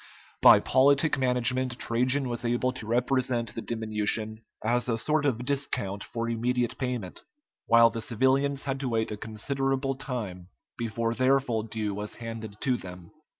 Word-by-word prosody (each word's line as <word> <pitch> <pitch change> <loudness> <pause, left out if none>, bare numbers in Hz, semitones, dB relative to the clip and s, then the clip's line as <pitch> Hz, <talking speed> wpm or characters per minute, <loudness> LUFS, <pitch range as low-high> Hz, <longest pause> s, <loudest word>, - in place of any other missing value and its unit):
By - - +9
politic 140 +3 +3
management 125 0 +1
Trajan 125 +4 0
was 120 -1 -3
able 120 +2 +1
to 130 -4 -8
represent 120 0 0
the 115 - -5
diminution 110 -1 -2 0.2
as 120 +2 +1
a 115 - +1
sort 150 +5 +1
of 125 -2 -1
discount 125 -8 -2
for 115 0 -4
immediate 120 +1 -1
payment, 125 -8 -4 0.5
while 115 0 +6
the 115 - -4
civilians 135 +4 +1
had 135 -1 -2
to 135 -2 -2
wait 110 -2 0
a - - -2
considerable 135 +5 -2
time 110 -10 -5 0.3
before 115 0 -2
their 130 +3 +3
full 120 -5 -2
due 110 -1 -3
was 105 +1 -5
handed 115 -3 -7
to 130 -2 +1
them. 90 -3 -10
120 Hz, 155 wpm, -27 LUFS, 110-130 Hz, 0.5 s, By